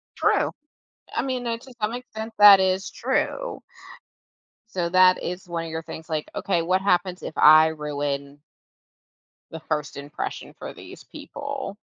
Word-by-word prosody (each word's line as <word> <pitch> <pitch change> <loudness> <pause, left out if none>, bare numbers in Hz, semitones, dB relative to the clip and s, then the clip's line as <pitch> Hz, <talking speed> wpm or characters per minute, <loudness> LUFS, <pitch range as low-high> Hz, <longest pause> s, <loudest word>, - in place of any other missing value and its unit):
True. - - +2 0.6
I - - 0
mean, 255 -2 -3
it 230 0 -3
to 260 -2 -14
some 210 +2 0
extent, 225 -3 -7
that 205 -2 +10
is 190 +1 0
true. - - -2 1.1
So 175 -2 -1
that 185 0 +5
is 180 +1 -5
one 170 -1 -3
of 160 - -7
your 160 0 -3
things, 160 0 -9
like, 155 -1 -3
"Okay, 175 -4 0
what 185 +3 +1
happens 180 -1 0
if - - -7
I 155 +1 +8
ruin" 145 -2 -4 1.1
the 160 - -7
first 150 -2 -3
impression 145 +1 -6
for - - -7
these - - -12
people? 280 -7 -7
180 Hz, 150 wpm, -24 LUFS, 160-210 Hz, 1.1 s, that